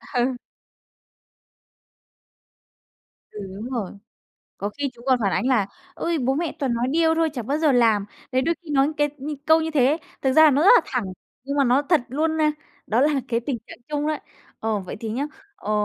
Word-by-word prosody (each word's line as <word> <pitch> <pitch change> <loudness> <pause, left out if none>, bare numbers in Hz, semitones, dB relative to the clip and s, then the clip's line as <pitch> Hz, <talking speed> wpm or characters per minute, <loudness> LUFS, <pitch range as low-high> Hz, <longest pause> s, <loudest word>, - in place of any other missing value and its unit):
Ừ. 250 +1 +1 2.9
Ừ, 210 - -9 0.2
đúng 220 +5 -6
rồi. 230 -8 -3 0.7
Có 200 - -2
khi 285 -1 -1
chúng 235 0 -16
còn 260 -2 +4
phản 195 -2 +1
ánh 195 +7 0
là 240 -7 +3 0.3
"Ôi, 335 -1 -1
bố 265 0 +1
mẹ 320 +2 -2
toàn 265 -4 0
nói 235 +1 0
điêu 320 +2 +3
thôi, 325 -1 +1
chả 250 -5 -4
bao 275 +7 -1
giờ 310 -3 +3
làm." 225 -5 +3 0.3
Đấy, 260 +1 +2
đôi 335 +5 +1
khi 330 - -10
nói 275 -1 +3
cái 295 0 +2
như 295 +3 -4
câu 320 +1 +6
như 320 0 -2
thế, 280 0 +3 0.3
thực 265 - +2
ra 315 +2 +7
nó 285 +2 +2
rất 370 - +5
là - - +7
thẳng, 250 -4 -2 0.4
nhưng 280 +1 -3
mà 280 - +4
nó 255 +3 +3
thật 320 +2 +3
luôn, 315 +5 0
a, 305 -1 +3 0.3
đó 225 +3 +2
là 285 -1 +3
cái 230 -1 0
tình 240 0 -3
trạng - - -11
chung 295 0 -1
đó. 310 - 0 0.4
Ờ, 220 -1 0
vậy 185 - -7
thì 225 - -4
nhá, 265 +6 -2 0.3
ờ, 210 - -6
270 Hz, 210 wpm, -23 LUFS, 240-305 Hz, 2.9 s, ra